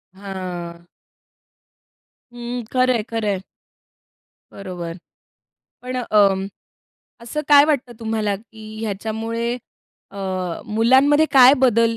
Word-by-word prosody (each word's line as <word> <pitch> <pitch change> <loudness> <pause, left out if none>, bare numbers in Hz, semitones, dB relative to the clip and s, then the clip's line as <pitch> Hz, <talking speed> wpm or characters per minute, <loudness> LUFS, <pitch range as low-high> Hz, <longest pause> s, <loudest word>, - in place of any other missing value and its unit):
हां. 180 -3 -7 1.5
हं, 240 0 -5
खरंय, 255 -3 +2
खरंय. 210 -4 -2 1.1
बरोबर, 180 -3 -7 0.9
पण 255 0 -5
अं, 200 -5 +2 0.7
असं 240 +6 -4
काय 285 -1 +8
वाटतं 275 -5 -1
तुम्हाला, 220 -2 -1
की 220 0 -13
ह्याच्यामुळे 225 +3 -3 0.5
अ, 200 - -11 0.5
मुलांमध्ये 260 +8 +4
काय 265 -1 +8
बदल 230 -2 +3
225 Hz, 85 wpm, -21 LUFS, 200-245 Hz, 1.5 s, काय